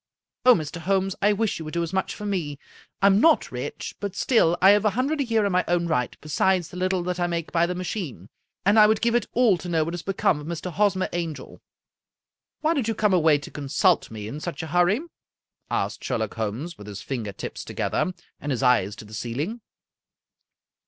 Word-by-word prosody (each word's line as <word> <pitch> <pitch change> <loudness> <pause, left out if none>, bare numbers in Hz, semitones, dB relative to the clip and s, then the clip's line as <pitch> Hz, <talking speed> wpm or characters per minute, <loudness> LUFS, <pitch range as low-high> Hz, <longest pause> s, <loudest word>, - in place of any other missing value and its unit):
Oh, 250 - +9
Mr. 155 +1 -4
Holmes, 195 +2 0
I 205 - +4
wish 210 -2 0
you 160 - -6
would 155 - -7
do 170 - +1
as 170 +2 -5
much 190 - -1
for 210 - -7
me. 170 -8 -2 0.5
I'm 200 +1 +6
not 325 -1 +4
rich, - - -5
but 200 -2 -4
still 175 -10 +3
I 190 +2 +7
have 205 0 +4
a 215 - +4
hundred 285 +4 +1
a - - +3
year 225 -4 +1
in 200 - +1
my 180 0 +2
own 175 0 +1
right, 125 -7 -1
besides 175 +3 +1
the 180 - -9
little 185 0 0
that 180 0 -3
I 175 - +1
make 170 -2 -3
by 170 0 +2
the 180 - -3
machine, 175 - -5 0.4
and 205 +3 +5
I 210 - +8
would 215 0 +2
give 235 0 +1
it 240 - +1
all 225 -7 +4
to 175 - -7
know 165 -2 +2
what 165 +2 -4
has 175 - -4
become 190 -5 +1
of 150 - -9
Mr. 170 +2 -4
Hosmer 195 -1 +2
Angel." 165 -6 -5 0.5
" - - -65
Why 315 +1 +2
did 270 -8 -1
you 225 - 0
come 210 -2 +2
away 160 -4 +5
to 145 - -10
consult 150 +6 +1
me 105 -2 -7
in 140 +7 -6
such 175 +1 -5
a - - -5
hurry?" 180 +8 +3 0.7
asked - - -2
Sherlock 110 -5 -2
Holmes, 115 +10 -4
with 105 - -10
his 100 -2 -7
finger 115 -6 -4
tips - - -7
to - - -8
gether, 185 - 0 0.3
and 145 - -4
his 130 0 -1
eyes 115 -6 +3
to - - -11
the 105 - -14
ceiling. 135 - -4
175 Hz, 225 wpm, -25 LUFS, 150-200 Hz, 0.7 s, Oh